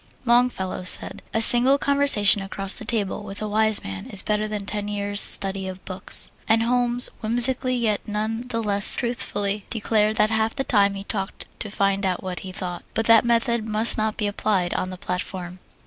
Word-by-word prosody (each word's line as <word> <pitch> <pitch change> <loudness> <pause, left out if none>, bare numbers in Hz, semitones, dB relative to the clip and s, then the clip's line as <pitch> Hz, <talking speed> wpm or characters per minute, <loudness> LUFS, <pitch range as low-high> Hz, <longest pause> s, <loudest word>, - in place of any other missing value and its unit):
Longfellow 235 -7 -1
said: 185 - +1
"A 225 - -1
single 250 +4 +5
conversation 280 -9 +5
across 195 0 -3
the - - -6
table 210 -4 -3
with 200 -1 -9
a 215 - -5
wise 220 0 +4
man 95 0 -9
is 195 - -1
better 210 0 -2
than 210 -2 -6
ten 205 0 -5
years' 205 0 -2
study 195 -1 +2
of 185 0 -10
books," 185 0 -1 0.2
and 225 0 +1
Holmes 245 0 0
whimsically 245 +3 +4
yet 220 -4 -3
none 220 +3 -5
the 230 -2 -4
less 205 -1 +4
truthfully 205 -4 -4
declared 215 -1 -1
that 215 0 +1
half 220 0 -1
the 270 - -3
time 200 -5 0
he 195 - -8
talked 195 -1 -6
to 210 - -6
find 195 0 -2
out 185 -2 -3
what 185 -1 -6
he 190 - -9
thought. 180 -1 -7
But 225 - -2
that 230 -1 +5
method 235 -1 -1
must 215 +2 +4
not 215 0 -3
be 210 - -3
applied 205 -3 -2
on 185 - -4
the 185 - -9
platform! 180 0 -7
210 Hz, 195 wpm, -21 LUFS, 195-230 Hz, 0.2 s, single